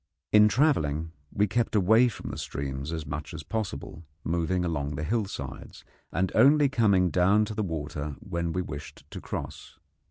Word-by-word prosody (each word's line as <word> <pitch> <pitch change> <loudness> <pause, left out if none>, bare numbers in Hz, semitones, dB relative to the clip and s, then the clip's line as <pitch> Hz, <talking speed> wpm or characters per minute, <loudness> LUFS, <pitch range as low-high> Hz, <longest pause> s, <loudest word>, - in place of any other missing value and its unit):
In 105 0 +7
travelling 80 - +1 0.2
we 105 - +2
kept 115 +3 0
away 110 +5 +5
from 120 - -6
the - - -6
streams 70 +1 -4
as 80 -2 -4
much 75 0 -5
as - - -6
possible, 90 -7 -4 0.2
moving 85 +2 0
along 70 -4 -2
the 75 - -3
hillsides, 95 - -4 0.3
and 95 +3 0
only 140 +4 +6
coming 100 -8 +3
down 100 +4 +4
to 105 - -5
the 110 - -2
water 75 -5 -4
when 85 0 -3
we 90 +2 -1
wished 75 -3 -8
to - - -7
cross. - - -7
90 Hz, 165 wpm, -28 LUFS, 75-105 Hz, 0.3 s, In